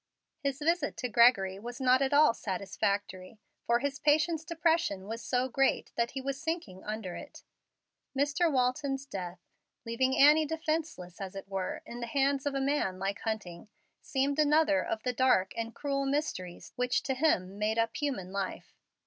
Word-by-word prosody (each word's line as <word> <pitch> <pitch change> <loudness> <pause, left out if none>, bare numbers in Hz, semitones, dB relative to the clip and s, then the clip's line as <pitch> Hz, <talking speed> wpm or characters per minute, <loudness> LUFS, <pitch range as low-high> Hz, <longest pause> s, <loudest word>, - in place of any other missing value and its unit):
His 275 -3 -2
visit 315 0 0
to 250 - -3
Gregory 210 -5 +4
was 240 +3 -7
not 260 0 +4
at 270 - +1
all 290 -3 +6
satisfactory, 200 -1 -3 0.3
for 235 - +4
his 280 +2 -3
patient's 310 +2 +2
depression 325 - 0
was 225 +2 -5
so 250 0 0
great 270 +2 +1
that 235 0 +1
he 265 - -3
was 275 +1 -4
sinking 320 - -4
under 210 -4 -5
it. - - -10 0.7
Mr. 295 +4 +2
Walton's 270 +1 0
death, 185 -8 -6 0.5
leaving 260 +3 +1
Annie 300 +2 +6
defenceless, 315 - -3
as 195 0 -6
it 195 - -7
were, 195 -1 -4
in 240 - -8
the 235 - -4
hands 275 +2 +1
of 280 - -1
a - - +1
man 270 -9 0
like 195 +1 -2
Hunting, 210 -3 -5 0.3
seemed 280 +1 0
another 300 0 +4
of 220 - -3
the 250 - -1
dark 245 -7 +3
and 230 0 -4
cruel 275 -1 -1
mysteries 270 - -3
which 250 0 0
to 270 - -1
him 205 - +1
made 215 +1 0
up 230 0 +1
human 255 -12 -3
life. 195 -1 -4
255 Hz, 170 wpm, -30 LUFS, 200-290 Hz, 0.7 s, all